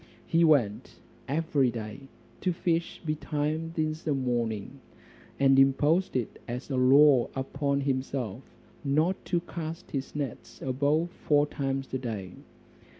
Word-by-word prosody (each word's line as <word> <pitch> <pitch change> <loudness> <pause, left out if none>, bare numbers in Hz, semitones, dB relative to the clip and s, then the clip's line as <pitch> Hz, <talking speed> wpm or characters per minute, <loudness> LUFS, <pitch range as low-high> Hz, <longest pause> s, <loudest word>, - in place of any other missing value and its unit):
He 165 +1 +3
went 130 -11 +2 0.3
every 145 -3 +1
day 115 +3 -7 0.3
to 185 - 0
fish 170 -1 -1
betimes 155 +1 -2
in 155 -1 +1
the 150 -3 0
morning; 120 -2 -2 0.6
and 135 -1 +5
imposed 145 +7 +3
it 125 -4 -2
as 125 +4 -5
a - - 0
law 130 0 +6
upon 140 +1 -1
himself, 130 -4 -2 0.4
not 155 +7 +1
to 175 -2 0
cast 165 0 -7
his 135 0 -4
nets 140 -5 -5
above 145 +6 +1
four 145 -4 +2
times 135 -2 -3
a 130 - 0
day. 105 -7 -5
140 Hz, 130 wpm, -28 LUFS, 130-155 Hz, 0.6 s, law